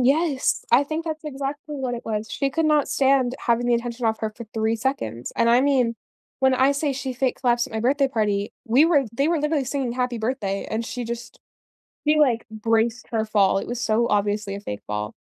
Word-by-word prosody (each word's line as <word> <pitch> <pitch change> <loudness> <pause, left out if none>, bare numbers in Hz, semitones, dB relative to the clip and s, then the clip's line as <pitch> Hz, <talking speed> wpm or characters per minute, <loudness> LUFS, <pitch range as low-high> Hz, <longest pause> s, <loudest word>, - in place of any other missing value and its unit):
Yes, 280 +2 +2
I 250 +4 +5
think 310 +3 -3
that's 315 -1 -5
exactly 290 +1 -5
what 260 -3 -2
it 235 - -7
was. 215 -1 -3
She 275 - -1
could 325 +4 0
not 300 -2 +3
stand 265 -2 +2
having 240 0 +2
the 240 - +3
attention 235 0 -2
off 220 0 0
her 220 - -1
for 230 +2 -10
3 220 0 +1
seconds 215 - -3
and 230 0 +3
I 240 +1 +5
mean, 255 -4 +2 0.4
when 265 -1 +4
I 260 +2 +4
say 280 0 0
she 265 0 -4
fake 250 +1 -1
collapsed 240 -1 +2
at 260 - -14
my 220 - -2
birthday 275 +4 +2
party, 210 -5 -1
we 255 +5 +5
were 325 -4 +4
they 275 +5 +1
were 330 -1 +1
literally 300 -2 0
singing 265 -1 -2
happy 250 0 -2
birthday 220 -4 -2
and 225 +1 -2
she 245 - -4
just 235 0 -7 0.7
she 305 0 +4
like 245 -6 +2
braced 225 +1 0
her 225 -2 0
fall, 200 -3 +3
it - - -4
was 245 0 -4
so 230 0 +2
obviously 205 0 0
a 200 - -6
fake 105 - -6
fall. 105 0 -4
245 Hz, 220 wpm, -23 LUFS, 220-275 Hz, 0.7 s, I